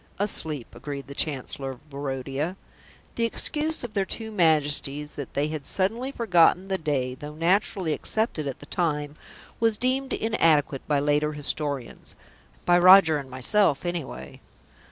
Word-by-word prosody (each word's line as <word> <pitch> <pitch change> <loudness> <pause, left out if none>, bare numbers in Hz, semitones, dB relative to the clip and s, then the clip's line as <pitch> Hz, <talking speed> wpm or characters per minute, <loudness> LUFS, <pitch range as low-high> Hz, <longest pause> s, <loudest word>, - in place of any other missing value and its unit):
"Asleep," 160 - -2
agreed 140 +3 -7
the 140 - -9
Chancellor 140 -2 -2
of 130 +3 -11
Barodia. 140 +4 -3 0.6
"The 230 - 0
excuse 305 +7 -1
of 240 -3 -6
their 200 - +1
two 220 +3 -3
Majesties 150 -5 +1
that 140 -3 -8
they 145 +2 0
had 155 -3 -5
suddenly 225 +8 0
forgotten 185 -5 +3
the 190 -1 -1
day, 135 -5 -1
though 150 +3 -9
naturally 180 0 +1
accepted 195 -6 0
at 135 - -4
the - - -10
time, 150 -3 -2 0.4
was 225 -2 +2
deemed 265 +3 -1
inadequate 155 -10 +2
by 145 -2 +2
later 150 +1 +1
historians." 145 -3 -3 0.5
(By 175 0 +5
Roger 180 -4 +7
and 135 -2 -9
myself, 140 +5 +2
anyway.) 145 - -5
155 Hz, 145 wpm, -25 LUFS, 140-195 Hz, 0.6 s, Roger